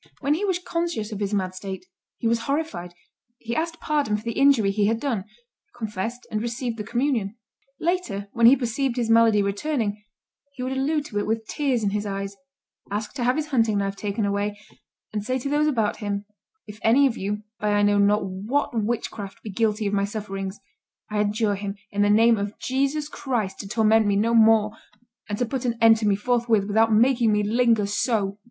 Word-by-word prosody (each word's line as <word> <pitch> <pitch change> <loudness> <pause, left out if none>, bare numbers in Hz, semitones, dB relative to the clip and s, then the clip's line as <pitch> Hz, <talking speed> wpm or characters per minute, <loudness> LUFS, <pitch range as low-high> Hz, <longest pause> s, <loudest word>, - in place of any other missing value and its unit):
When 285 - +1
he 340 +7 -2
was 380 -3 +1
conscious 335 -11 -3
of 210 - -5
his 200 -1 -2
mad 190 -3 -1
state, 190 - -7 0.3
he 230 - -1
was 230 0 +2
horrified; 280 - -2 0.4
he 235 0 -5
asked 330 +1 -2
pardon 290 -9 0
for 210 - -10
the 230 - -2
injury 260 -6 +4
he 205 0 +1
had 225 +1 +1
done, 230 -9 -2 0.5
confessed 225 +1 -4
and 215 -1 -1
received 235 0 -3
the 210 - -4
communion. 235 -2 -1 0.4
Later, 320 - -1
when 235 -1 +5
he 255 - +8
perceived 250 0 -1
his 230 -2 0
malady 225 -2 +5
returning, 210 0 -2 0.5
he 250 - -5
would 255 - -2
allude 285 +3 0
to 205 -5 -3
it 205 - -2
with 225 0 -1
tears 265 -6 0
in 200 - +1
his 210 0 -2
eyes, 195 0 -4 0.5
ask 210 +1 -3
to 260 -3 -3
have 250 +1 +2
his 305 0 -2
hunting 225 -6 +2
knife 200 0 -1
taken 205 +1 -2
away, 205 +1 -1 0.5
and 210 -1 -2
say 255 +4 -1
to 260 +2 -4
those 295 +1 +2
about 225 -8 0
him, 205 -2 -3 0.4
"If 210 0 -11
any 255 +6 +5
of 255 -4 +1
you, 210 +2 -3 0.2
by 210 0 0
I 205 - +3
know 205 0 +3
not 205 +1 +3
what 205 +10 -1
witchcraft, 215 -3 -3
be 215 - -6
guilty 215 +1 0
of 200 - -1
my 200 -1 +2
sufferings, 195 -2 -5 0.5
I 210 - 0
adjure 210 0 +1
him, 200 0 -4 0.2
in 205 - -1
the 205 - +4
name 225 +2 +5
of 200 +1 -4
Jesus 275 +3 -1
Christ, 240 -10 -3
to 200 - -6
torment 220 0 +3
me 200 - +2
no 225 +3 +2
more, 220 -2 +5 0.6
and 205 - -2
to 245 - 0
put 260 +2 -3
an 235 -2 -1
end 225 -1 +7
to 215 -1 -1
me 200 - +3
forthwith 230 -1 +1
without 220 +2 +3
making 235 +1 +4
me 210 0 +2
linger 225 0 +2
so." 205 -1 -1
220 Hz, 205 wpm, -24 LUFS, 205-250 Hz, 0.6 s, he